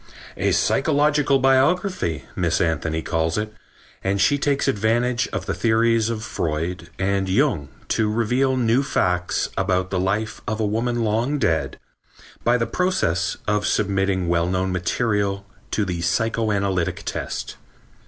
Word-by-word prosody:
"A -, -, 0 dB
psychological 145 Hz, -1 st, +2 dB
biography," 135 Hz, -, +1 dB
Miss 85 Hz, -2 st, +1 dB
Anthony 80 Hz, -1 st, -1 dB
calls 80 Hz, +1 st, 0 dB
it, 105 Hz, 0 st, -3 dB, 0.5 s
and 100 Hz, +1 st, 0 dB
she 145 Hz, +9 st, +3 dB
takes 140 Hz, 0 st, +1 dB
advantage 120 Hz, 0 st, +1 dB
of -, -, -4 dB
the -, -, -1 dB
theories 115 Hz, 0 st, +2 dB
of 110 Hz, -1 st, -3 dB
Freud 85 Hz, -1 st, -3 dB
and 95 Hz, 0 st, 0 dB
Jung 95 Hz, -, +1 dB, 0.2 s
to 110 Hz, -1 st, +1 dB
reveal 125 Hz, +4 st, +1 dB
new 120 Hz, +1 st, +3 dB
facts 90 Hz, -10 st, 0 dB
about 95 Hz, -1 st, 0 dB
the 95 Hz, -, 0 dB
life 105 Hz, +4 st, -1 dB
of 110 Hz, +1 st, -2 dB
a 110 Hz, -, +1 dB
woman 115 Hz, +3 st, 0 dB
long 115 Hz, +7 st, 0 dB
dead, 80 Hz, -, 0 dB, 0.7 s
by 120 Hz, +1 st, +3 dB
the 115 Hz, -, 0 dB
process 180 Hz, -, 0 dB
of 105 Hz, -1 st, +1 dB
submitting 95 Hz, -3 st, +1 dB
well 85 Hz, 0 st, +1 dB
known 95 Hz, +1 st, 0 dB
material 100 Hz, +2 st, 0 dB, 0.2 s
to 105 Hz, -, 0 dB
the 90 Hz, -2 st, -3 dB
psychoanalytic 100 Hz, -2 st, 0 dB
test. -, -, -4 dB
105 Hz, 140 wpm, -22 LUFS, 90-120 Hz, 0.7 s, she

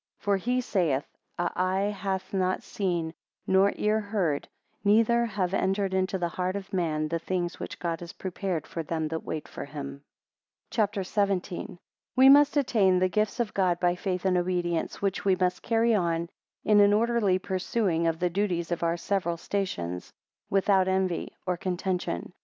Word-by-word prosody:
8 -, -, -30 dB
For 200 Hz, -1 st, +2 dB
he 250 Hz, +6 st, 0 dB
saith, 165 Hz, -, 0 dB, 0.3 s
a 175 Hz, 0 st, 0 dB
Eye 190 Hz, +3 st, +1 dB
hath 195 Hz, -1 st, -3 dB
not 185 Hz, -1 st, 0 dB
seen, 175 Hz, -5 st, -2 dB, 0.3 s
nor 190 Hz, +1 st, +4 dB
ear 215 Hz, +1 st, +1 dB
heard, 200 Hz, -9 st, -1 dB, 0.4 s
neither 230 Hz, +3 st, +4 dB
have 195 Hz, -4 st, -2 dB
entered 195 Hz, 0 st, +1 dB
into 190 Hz, +1 st, +1 dB
the 175 Hz, -2 st, -1 dB
heart 185 Hz, +2 st, -2 dB
of 195 Hz, -1 st, -6 dB
man, 155 Hz, -4 st, 0 dB
the 165 Hz, +1 st, -1 dB
things 175 Hz, 0 st, -2 dB
which -, -, -6 dB
God 170 Hz, -2 st, -2 dB
has 175 Hz, 0 st, -8 dB
prepared 185 Hz, -2 st, -3 dB
for 165 Hz, -, -5 dB
them 160 Hz, 0 st, -2 dB
that 160 Hz, 0 st, -4 dB
wait 155 Hz, -, -5 dB
for -, -, -7 dB
him, 140 Hz, -1 st, -7 dB, 0.7 s
CHAPTER 205 Hz, -3 st, 0 dB
XVII. 200 Hz, +1 st, +1 dB, 0.4 s
1 -, -, -35 dB, 0.4 s
We 260 Hz, +1 st, +8 dB
must 290 Hz, +1 st, +6 dB
attain 210 Hz, -9 st, +3 dB
the 185 Hz, 0 st, +2 dB
gifts 215 Hz, +5 st, 0 dB
of 235 Hz, -3 st, -1 dB
God 180 Hz, -3 st, +1 dB
by 175 Hz, -1 st, +3 dB
faith 185 Hz, 0 st, -3 dB
and 185 Hz, -1 st, +3 dB
obedience, 175 Hz, 0 st, -1 dB
which 195 Hz, -1 st, 0 dB
we 195 Hz, -2 st, +3 dB
must 180 Hz, 0 st, 0 dB
carry 230 Hz, 0 st, +2 dB
on 170 Hz, -4 st, 0 dB, 0.4 s
in 210 Hz, -1 st, +5 dB
an 205 Hz, 0 st, +6 dB
orderly 220 Hz, -3 st, +2 dB
pursuing 185 Hz, -2 st, 0 dB
of 165 Hz, -1 st, 0 dB
the 175 Hz, +1 st, 0 dB
duties 175 Hz, -3 st, -1 dB
of 175 Hz, -, -1 dB
our 170 Hz, 0 st, +1 dB
several 175 Hz, -2 st, -1 dB
stations, 90 Hz, -, -3 dB, 0.4 s
without 195 Hz, -1 st, +3 dB
envy 190 Hz, -2 st, -1 dB
or 180 Hz, -1 st, 0 dB
contention. 180 Hz, -, -2 dB
185 Hz, 175 wpm, -27 LUFS, 170-200 Hz, 0.7 s, We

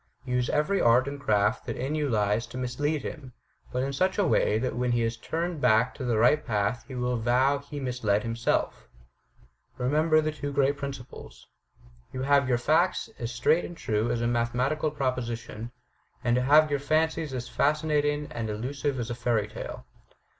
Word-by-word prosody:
Use 125 Hz, -1 st, 0 dB
every 150 Hz, +7 st, +1 dB
art 120 Hz, +3 st, +4 dB
and 140 Hz, 0 st, -5 dB
craft 105 Hz, -4 st, +1 dB
that -, -, -3 dB
in 135 Hz, +4 st, -2 dB
you 150 Hz, -2 st, 0 dB
lies 105 Hz, 0 st, +1 dB
to 120 Hz, -, -9 dB
mislead 135 Hz, +4 st, -1 dB
him, 135 Hz, -5 st, -7 dB, 0.4 s
but 125 Hz, +1 st, -1 dB
in 140 Hz, +1 st, -2 dB
such 185 Hz, +6 st, +1 dB
a 205 Hz, -, +3 dB
way 110 Hz, -, +2 dB
that 125 Hz, +3 st, -2 dB
when 125 Hz, 0 st, 0 dB
he 120 Hz, -1 st, +1 dB
is 115 Hz, +1 st, -1 dB
turned 165 Hz, +6 st, -3 dB
back 110 Hz, +3 st, +3 dB
to -, -, -7 dB
the 120 Hz, -3 st, +1 dB
right 135 Hz, +7 st, +4 dB
path 105 Hz, +2 st, -1 dB
he 130 Hz, -, -8 dB
will 125 Hz, 0 st, -1 dB
vow 125 Hz, +5 st, +2 dB
he 145 Hz, +1 st, -8 dB
misled 120 Hz, -6 st, 0 dB
himself. 115 Hz, -, -1 dB, 0.9 s
Remember 155 Hz, +5 st, +3 dB
the 155 Hz, 0 st, 0 dB
two 145 Hz, -2 st, -5 dB
great 140 Hz, 0 st, +2 dB
principles: 140 Hz, -3 st, -8 dB, 0.7 s
to 130 Hz, 0 st, -3 dB
have 140 Hz, -1 st, +3 dB
your 125 Hz, -, +3 dB
facts 165 Hz, -, +1 dB
as 120 Hz, -1 st, -3 dB
straight 120 Hz, +8 st, +2 dB
and 175 Hz, -, -8 dB
true 110 Hz, +1 st, -1 dB
as 120 Hz, 0 st, -1 dB
a -, -, +1 dB
mathematical 125 Hz, +6 st, 0 dB
proposition; 120 Hz, -5 st, -3 dB, 0.5 s
and 120 Hz, -1 st, +2 dB
to 125 Hz, -, +2 dB
have 150 Hz, +3 st, +5 dB
your 145 Hz, -, +1 dB
fancies 155 Hz, +1 st, 0 dB
as 125 Hz, -1 st, -4 dB
fascinating 150 Hz, 0 st, +1 dB
and 115 Hz, -2 st, -4 dB
elusive 135 Hz, +5 st, -3 dB
as 120 Hz, 0 st, -3 dB
a -, -, -1 dB
fairy 120 Hz, -3 st, 0 dB
tale. -, -, -8 dB
130 Hz, 185 wpm, -27 LUFS, 120-145 Hz, 0.9 s, have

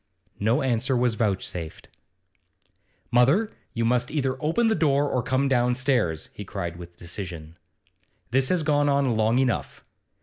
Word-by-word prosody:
No 115 Hz, +8 st, +1 dB
answer 130 Hz, +1 st, +1 dB
was 120 Hz, -1 st, +2 dB
vouchsafed. 95 Hz, -6 st, -3 dB, 1.2 s
'Mother, 140 Hz, -, +3 dB, 0.2 s
you 115 Hz, -1 st, 0 dB
must 125 Hz, +1 st, +1 dB
either 135 Hz, -4 st, -1 dB
open 165 Hz, +10 st, +1 dB
the 225 Hz, -, +3 dB
door 145 Hz, -5 st, +2 dB
or 125 Hz, -, 0 dB
come 130 Hz, +3 st, 0 dB
downstairs,' 125 Hz, -, +1 dB
he 105 Hz, -, -7 dB
cried 85 Hz, -4 st, -5 dB
with 85 Hz, 0 st, -11 dB
decision. 85 Hz, -3 st, -7 dB, 0.8 s
'This 130 Hz, +1 st, +2 dB
has 180 Hz, -3 st, +1 dB
gone 145 Hz, -1 st, +2 dB
on 140 Hz, -4 st, +2 dB
long 110 Hz, +2 st, +2 dB
enough. 130 Hz, -2 st, -1 dB
125 Hz, 140 wpm, -25 LUFS, 105-140 Hz, 1.2 s, Mother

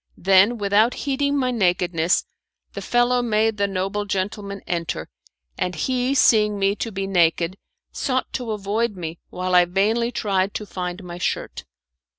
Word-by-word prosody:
Then, 195 Hz, +5 st, +4 dB
without 210 Hz, +3 st, +2 dB
heeding 280 Hz, 0 st, -1 dB
my 255 Hz, -2 st, +1 dB
nakedness, 180 Hz, -5 st, +1 dB, 0.5 s
the -, -, -6 dB
fellow 245 Hz, +1 st, +2 dB
made 220 Hz, -1 st, +1 dB
the 200 Hz, 0 st, +1 dB
noble 195 Hz, +2 st, -2 dB
gentleman 200 Hz, 0 st, -3 dB
enter, 165 Hz, -, -3 dB, 0.5 s
and 180 Hz, -1 st, -1 dB
he 255 Hz, -, 0 dB
seeing 210 Hz, -5 st, +4 dB
me 195 Hz, 0 st, +1 dB
to 225 Hz, -, -3 dB
be 195 Hz, -1 st, -3 dB
naked, 175 Hz, -1 st, +2 dB, 0.4 s
sought 260 Hz, -2 st, -2 dB
to 245 Hz, -3 st, -4 dB
avoid 210 Hz, +1 st, -1 dB
me 165 Hz, -2 st, -6 dB
while 185 Hz, 0 st, -3 dB
I 180 Hz, -1 st, +6 dB
vainly 215 Hz, +6 st, +1 dB
tried 200 Hz, -4 st, -1 dB
to 210 Hz, -, -4 dB
find 180 Hz, -1 st, -5 dB
my 175 Hz, 0 st, -8 dB
shirt. -, -, -3 dB
200 Hz, 155 wpm, -22 LUFS, 180-230 Hz, 0.5 s, I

